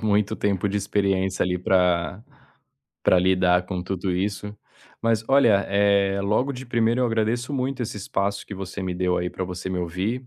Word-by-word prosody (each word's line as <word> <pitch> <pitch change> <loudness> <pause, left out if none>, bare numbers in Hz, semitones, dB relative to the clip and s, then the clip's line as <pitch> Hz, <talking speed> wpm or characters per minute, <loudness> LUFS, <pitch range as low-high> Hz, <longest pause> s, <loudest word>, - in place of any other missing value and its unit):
É - - -18
muito 105 -1 +1
tempo 100 -1 0
de 100 - -1
experiência, 95 -2 0
ali, 90 0 -1
pra 90 +1 +1 0.8
pra 90 - +5
lidar 90 -1 +3
com 90 -2 -3
tudo 95 0 -3
isso. 100 +2 -2 0.5
Mas 115 -1 +1
olha, 115 -8 +5
eh, 100 -1 +2
logo 115 +8 +1
de 130 0 -8
primeira 120 +1 +1
eu 125 - +3
agradeço 115 +3 -1
muito 130 0 -2
esse 110 -2 -4
espaço 100 0 -2
que - - -9
você 95 0 -6
me 90 -1 -2
deu, 90 0 0
aí, 90 0 -2
pra 95 - -4
você 90 +1 -5
me 90 - -2
ouvir. 95 +9 -3
100 Hz, 185 wpm, -24 LUFS, 90-110 Hz, 0.8 s, pra